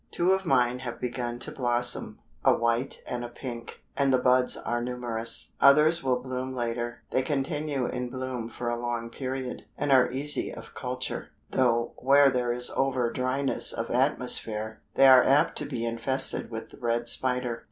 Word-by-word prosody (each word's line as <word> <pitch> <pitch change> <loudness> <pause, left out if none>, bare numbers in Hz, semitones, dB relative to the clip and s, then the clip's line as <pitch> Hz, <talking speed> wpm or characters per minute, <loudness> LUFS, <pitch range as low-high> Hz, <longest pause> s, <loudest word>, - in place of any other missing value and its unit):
Two 175 +2 +1
of 190 -1 +1
mine 125 -4 +2
have 120 -2 -6
begun 120 -1 -3
to 120 - -5
blossom 120 -1 0 0.3
a - - +5
white 115 +3 -1
and 120 -1 -4
a 120 - -5
pink 120 -1 -8
and 140 -1 +2
the 130 - +5
buds 125 0 +3
are 120 0 -2
numerous. 120 -2 -4
Others 150 +4 +6
will 130 -2 +1
bloom 130 0 -4
later. 120 -1 -3
They 130 - +2
continue 140 0 -1
in 125 0 -3
bloom 130 -2 -4
for 120 0 -6
a 120 0 -1
long 120 -1 -3
period, 130 -1 -5
and 145 - -1
are 130 -2 +5
easy 140 +3 0
of - - -11
culture, 125 -1 -4 0.2
though 120 -2 +1
where 140 +1 +5
there 125 -1 0
is 125 0 -2
over 130 -3 +1
dryness 130 +2 +1
of - - -4
atmosphere, 110 0 -1
they 135 - +6
are 130 -1 +8
apt 145 +4 +3
to - - -3
be 120 -5 -3
infested 125 +4 -2
with 110 -1 -7
the - - -14
red 120 0 -1
spider. 125 -1 0
125 Hz, 175 wpm, -27 LUFS, 120-135 Hz, 0.3 s, are